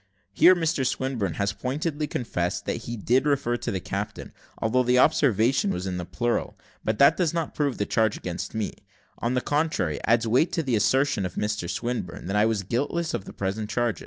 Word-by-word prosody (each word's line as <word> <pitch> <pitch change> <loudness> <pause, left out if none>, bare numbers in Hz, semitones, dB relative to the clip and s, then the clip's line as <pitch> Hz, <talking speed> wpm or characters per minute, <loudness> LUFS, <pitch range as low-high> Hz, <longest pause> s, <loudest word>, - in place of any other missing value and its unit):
Here 185 - +7
Mr 165 -5 0
Swinburne 125 - -1
has 100 0 0
pointedly 150 +5 -2
confessed 90 -9 -2
that 115 - -3
he 120 0 -4
did 125 +7 +2
refer 140 -4 +1
to - - -4
the 95 - -1
captain, 100 +2 -5 0.3
although 115 +3 +2
the 125 0 +3
observation 125 -5 +3
was 90 0 -2
in 90 -1 -3
the 90 - -4
plural; 120 +5 -2 0.3
but 110 0 -1
that 140 - +6
does 170 -3 +1
not 165 -2 -2
prove 145 -3 -1
the 100 - 0
charge 110 -1 +1
against 90 +4 -5
me 110 -2 -2 0.5
on 120 +2 -1
the 125 - +1
contrary, 145 - 0
adds 115 +1 +3
weight 130 +9 +3
to 165 - 0
the 130 -5 0
assertion 130 0 +2
of 90 -2 -4
Mr 105 -5 -2
Swinburne, 115 -3 -3
that 95 +3 -2
I 105 +1 +4
was 110 -3 0
guiltless 145 - -1
of 95 - -3
the - - -9
present 100 +2 -3
charge. 120 -1 0
115 Hz, 205 wpm, -26 LUFS, 100-135 Hz, 0.5 s, Here